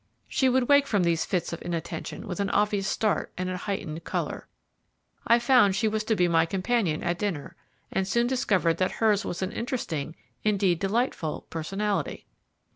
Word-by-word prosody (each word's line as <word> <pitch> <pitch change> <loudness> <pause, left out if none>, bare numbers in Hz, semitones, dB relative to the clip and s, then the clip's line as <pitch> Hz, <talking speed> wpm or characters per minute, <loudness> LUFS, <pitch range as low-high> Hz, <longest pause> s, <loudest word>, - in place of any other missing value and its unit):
She 265 - +2
would 255 -1 +2
wake 285 -1 +5
from 205 -7 +2
these 170 -1 +1
fits 180 -2 -1
of 170 - -6
inattention 170 -1 -5
with 180 -1 -4
an 200 0 0
obvious 205 -2 +1
start 215 -2 0
and 185 0 -2
a - - -2
heightened 170 -5 -4
colour. - - -3 0.8
I 235 - +6
found 240 -5 +4
she 220 +3 +1
was 215 0 0
to 220 - +2
be 180 -3 +3
my 165 -1 +3
companion 190 -3 0
at 175 0 -1
dinner, 185 -9 -3 0.4
and 190 0 0
soon 235 +4 +2
discovered 195 -10 +1
that 185 +1 0
hers 215 -2 +2
was 185 +2 -3
an 185 - -2
interesting, 215 - -3 0.3
indeed, 195 -5 +2
delightful, 195 - -1
personality. 195 +5 -2
195 Hz, 175 wpm, -27 LUFS, 175-220 Hz, 0.8 s, I